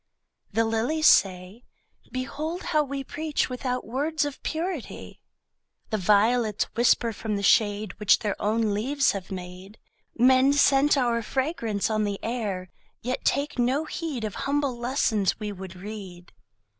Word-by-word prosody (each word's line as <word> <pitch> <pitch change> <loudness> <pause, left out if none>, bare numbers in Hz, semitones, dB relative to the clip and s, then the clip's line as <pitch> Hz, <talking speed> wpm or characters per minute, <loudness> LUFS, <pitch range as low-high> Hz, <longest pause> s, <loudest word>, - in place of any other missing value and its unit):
The 225 0 +2
lilies 235 +8 0
say: 185 +2 +3 0.5
Behold 305 +7 -4
how 305 -2 +2
we 275 -1 -4
Preach 300 -1 -2
without 250 0 -3
words 290 +5 -1
of 290 -2 -6
purity. 330 -3 -5 0.7
The 215 - 0
violets 210 +3 +3
whisper 235 0 +3
from 215 0 -3
the 200 - -3
shade 205 0 +3
Which 210 -2 +5
their 205 -3 -2
own 215 0 +1
leaves 275 +7 +1
have 195 -2 -6
made: 185 +2 -8 0.4
Men 260 +3 +5
scent 285 0 +4
our 240 -3 +1
fragrance 230 - -1
on 215 0 +1
the 205 -1 -2
air, 205 -6 -3 0.3
Yet 250 +2 -3
take 285 0 0
no 260 +6 +1
heed 310 -7 -4
Of 215 -2 -3 0.2
humble 285 -3 0
lessons 235 -5 0
we 210 -1 -4
would 190 -2 -9
read. 185 -2 -9
235 Hz, 145 wpm, -26 LUFS, 205-275 Hz, 0.7 s, Which